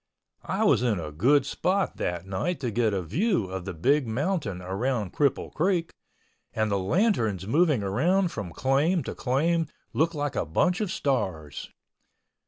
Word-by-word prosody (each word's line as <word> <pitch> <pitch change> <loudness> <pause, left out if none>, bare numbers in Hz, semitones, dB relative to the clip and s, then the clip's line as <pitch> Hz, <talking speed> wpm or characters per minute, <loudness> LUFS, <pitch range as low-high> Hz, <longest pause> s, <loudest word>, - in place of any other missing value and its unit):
I - - 0
was - - +4
in 115 -6 +1
a 75 -2 -5
good 130 - +3
spot 190 +7 0
that 85 0 -3
night 100 - -2
to 125 -4 -1
get 110 0 +1
a 95 -2 -1
view 180 - 0
of 95 -1 -5
the 95 - -4
Big 135 - +2
Mountain 125 - -1
around 100 +3 -2
Cripple 145 -2 0
Creek, 170 +1 0 0.6
and 110 -1 0
the 100 - +1
lanterns 110 - +1
moving 145 - +2
around 170 - +1
from 100 - -5
claim 145 - +1
to - - -5
claim 160 +5 +1 0.3
looked 165 +2 +1
like 145 -2 -2
a - - +1
bunch 180 - +1
of 205 -4 -1
stars. 90 - -2
130 Hz, 165 wpm, -27 LUFS, -, 0.6 s, was